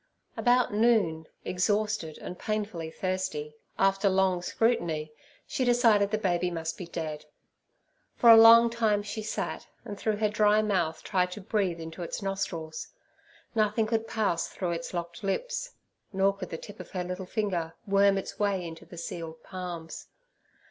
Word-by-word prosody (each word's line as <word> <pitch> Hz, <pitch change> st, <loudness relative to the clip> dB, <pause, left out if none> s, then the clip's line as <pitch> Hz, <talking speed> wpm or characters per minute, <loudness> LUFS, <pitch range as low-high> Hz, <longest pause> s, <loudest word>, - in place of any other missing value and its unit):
About 245 Hz, -2 st, +3 dB
noon, 205 Hz, -8 st, +2 dB, 0.2 s
exhausted 205 Hz, -2 st, 0 dB
and 180 Hz, -, -8 dB
painfully 205 Hz, -7 st, -3 dB
thirsty, 185 Hz, -4 st, -3 dB, 0.2 s
after 195 Hz, +1 st, +3 dB
long 190 Hz, -1 st, +2 dB
scrutiny, 170 Hz, -8 st, 0 dB, 0.3 s
she 260 Hz, -, -2 dB
decided 230 Hz, -5 st, +4 dB
the 215 Hz, -, 0 dB
baby 180 Hz, -3 st, 0 dB
must 165 Hz, -2 st, -3 dB
be 180 Hz, -, -8 dB
dead. 155 Hz, -3 st, -5 dB, 0.9 s
For 235 Hz, -, +7 dB
a -, -, +11 dB
long 230 Hz, +1 st, +8 dB
time 220 Hz, -3 st, +1 dB
she 215 Hz, +1 st, -5 dB
sat, 215 Hz, -, -4 dB, 0.2 s
and 205 Hz, -3 st, -7 dB
through 215 Hz, -1 st, 0 dB
her 215 Hz, +1 st, +1 dB
dry 210 Hz, 0 st, +3 dB
mouth 180 Hz, -6 st, 0 dB
tried 180 Hz, -1 st, +1 dB
to 210 Hz, -, -8 dB
breathe 190 Hz, -4 st, -1 dB
into 160 Hz, +2 st, -7 dB
its 170 Hz, -, -4 dB
nostrils; 175 Hz, -5 st, -3 dB, 0.7 s
nothing 215 Hz, 0 st, +2 dB
could 225 Hz, 0 st, -1 dB
pass 205 Hz, -7 st, 0 dB
through 180 Hz, -2 st, -3 dB
its 170 Hz, 0 st, -4 dB
locked 170 Hz, -1 st, -5 dB
lips, -, -, -2 dB, 0.4 s
nor 195 Hz, 0 st, +2 dB
could 185 Hz, -3 st, -7 dB
the 165 Hz, -, -4 dB
tip 205 Hz, +5 st, -11 dB
of -, -, -9 dB
her 180 Hz, -2 st, -3 dB
little 180 Hz, +1 st, -5 dB
finger 180 Hz, -6 st, -2 dB
worm 200 Hz, -1 st, +4 dB
its 195 Hz, -, -5 dB
way 200 Hz, -3 st, 0 dB
into 165 Hz, -1 st, -9 dB
the 175 Hz, -, -11 dB
sealed 165 Hz, -1 st, -6 dB
palms. 175 Hz, -3 st, -7 dB
195 Hz, 160 wpm, -28 LUFS, 170-215 Hz, 0.9 s, a